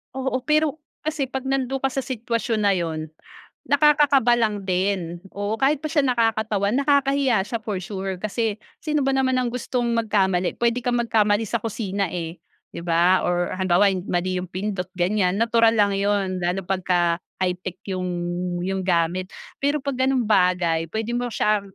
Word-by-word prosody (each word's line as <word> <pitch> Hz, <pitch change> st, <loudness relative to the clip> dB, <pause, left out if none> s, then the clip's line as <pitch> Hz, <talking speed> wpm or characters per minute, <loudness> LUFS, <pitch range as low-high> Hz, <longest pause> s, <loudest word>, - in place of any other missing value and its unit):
Oo, 265 Hz, -1 st, -2 dB
pero, 305 Hz, 0 st, +2 dB, 0.2 s
kasi, 310 Hz, -2 st, -2 dB
'pag 265 Hz, 0 st, -5 dB
nando'n 270 Hz, 0 st, -1 dB
ka 270 Hz, -, +1 dB
sa 270 Hz, +1 st, -2 dB
sitwasyon 230 Hz, -2 st, -2 dB
na 200 Hz, -1 st, +3 dB
'yon, 160 Hz, -3 st, -3 dB, 0.6 s
nakakakaba 285 Hz, -4 st, +4 dB
lang 210 Hz, -3 st, 0 dB
din. 185 Hz, -2 st, -1 dB, 0.2 s
Oo, 205 Hz, +2 st, -2 dB
kahit 275 Hz, +4 st, +2 dB
pa -, -, -2 dB
siya 295 Hz, -2 st, +3 dB
nakakatawa, 220 Hz, -4 st, +1 dB
nakakahiya 275 Hz, -3 st, +2 dB
siya, 230 Hz, -, -3 dB
for 210 Hz, -3 st, -3 dB
sure. 190 Hz, 0 st, -4 dB
Kasi, 215 Hz, 0 st, -1 dB, 0.2 s
sino 300 Hz, -2 st, 0 dB
ba 270 Hz, -, +3 dB
naman 260 Hz, -1 st, +2 dB
ang 250 Hz, -1 st, 0 dB
gustong 250 Hz, 0 st, -2 dB
magkamali, 195 Hz, -5 st, +1 dB
puwede 235 Hz, +1 st, +1 dB
kang 245 Hz, 0 st, 0 dB
magkamali 215 Hz, -2 st, +2 dB
sa 235 Hz, -, -1 dB
kusina 200 Hz, -3 st, -2 dB
eh, 170 Hz, -1 st, -5 dB, 0.3 s
'di -, -, -7 dB
ba, 175 Hz, +2 st, +4 dB
or 175 Hz, 0 st, 0 dB
halimbawa 185 Hz, +2 st, +4 dB, 0.2 s
mali 185 Hz, +1 st, -1 dB
yung 180 Hz, -, -4 dB
pindot, 190 Hz, 0 st, -3 dB
ganyan, 180 Hz, +1 st, +1 dB
natural 230 Hz, 0 st, +4 dB
lang 205 Hz, -2 st, +3 dB
'yon, 200 Hz, -2 st, 0 dB
lalo 180 Hz, +2 st, -1 dB
na -, -, -19 dB
pagka 185 Hz, -1 st, +1 dB, 0.4 s
high-tech 180 Hz, 0 st, -3 dB
yung 185 Hz, -1 st, -2 dB, 0.6 s
yung 190 Hz, 0 st, -2 dB
gamit. 175 Hz, +1 st, +1 dB, 0.3 s
Pero 285 Hz, +1 st, 0 dB
'pag 275 Hz, -2 st, -3 dB
gano'ng 265 Hz, -2 st, +2 dB
bagay, 180 Hz, -6 st, +2 dB
puwede 220 Hz, +6 st, -4 dB
mo 245 Hz, +1 st, -1 dB
siyang 200 Hz, -2 st, 0 dB
210 Hz, 165 wpm, -23 LUFS, 185-250 Hz, 0.6 s, nakakakaba